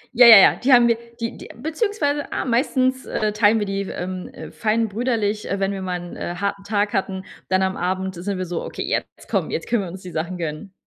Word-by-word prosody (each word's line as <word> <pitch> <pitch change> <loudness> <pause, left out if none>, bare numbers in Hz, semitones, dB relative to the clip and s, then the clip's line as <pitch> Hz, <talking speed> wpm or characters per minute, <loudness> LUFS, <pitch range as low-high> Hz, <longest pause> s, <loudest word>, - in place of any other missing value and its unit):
Ja, 245 0 +8
ja, 225 -3 +12
ja, 195 - +7
die 265 +2 +1
haben 240 -1 +7
wir 235 - +3 0.2
die 230 0 -3
die - - -10
beziehungsweise, 305 - -1
ah, - - -2
meistens, 255 +1 +1
äh, 215 -1 -1
teilen 210 +1 +4
wir 205 - 0
die, 195 0 -2
ähm, 185 0 -5
äh, - - -10
fein 225 0 0
brüderlich, 215 -1 -1
äh, 200 - -1
wenn 195 0 0
wir 195 -1 -4
mal 180 -1 -3
'n, 175 0 -9
äh, 175 - -4
harten 200 +1 -3
Tag 205 0 0
hatten. 190 -1 -2 0.3
Dann 190 0 +2
am 190 0 0
Abend 190 +1 -2
sind 185 +2 -4
wir 185 - -3
so: 175 -1 -4
„Okay, - - -5
jetzt - - -4
komm, - - -1
jetzt - - -4
können 235 -4 +1
wir 185 - -5
uns 185 +2 -10
die 180 - -8
Sachen 175 +3 -3
gönnen.“ 165 +4 -5
200 Hz, 245 wpm, -22 LUFS, 185-235 Hz, 0.3 s, ja